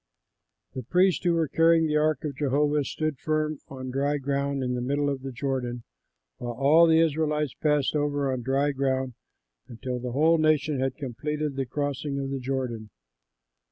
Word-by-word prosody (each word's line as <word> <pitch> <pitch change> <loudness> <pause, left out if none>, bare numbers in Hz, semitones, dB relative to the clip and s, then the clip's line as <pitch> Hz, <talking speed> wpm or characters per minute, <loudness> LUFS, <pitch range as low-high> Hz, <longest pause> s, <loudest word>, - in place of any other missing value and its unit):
The 130 - -4
priests 180 +9 +2
who 175 -1 +3
were 165 -2 +1
carrying 165 +2 +4
the 150 -1 0
ark 155 0 +1
of 145 -3 -3
Jehovah 145 +1 +1
stood 155 -1 -3
firm 155 0 -1
on 130 -1 -7
dry 140 +3 0
ground 140 0 -1
in 125 0 -1
the 125 - -2
middle 145 +3 0
of 135 -1 -4
the 135 0 -6
Jordan, 125 -2 -3 0.5
while 120 -1 -5
all 145 +7 +5
the 160 0 +5
Israelites 150 -3 +1
passed 150 -2 +1
over 145 -2 0
on 130 - -3
dry 135 +4 +1
ground, 130 -2 -1 0.5
until 125 +1 -5
the 125 -1 -5
whole 160 +4 +4
nation 155 -2 +2
had 130 0 -1
completed 145 +2 -3
the 135 -1 -2
crossing 145 +1 -2
of 135 0 -3
the 135 - -2
Jordan. 125 -4 -3
140 Hz, 175 wpm, -26 LUFS, 130-150 Hz, 0.5 s, all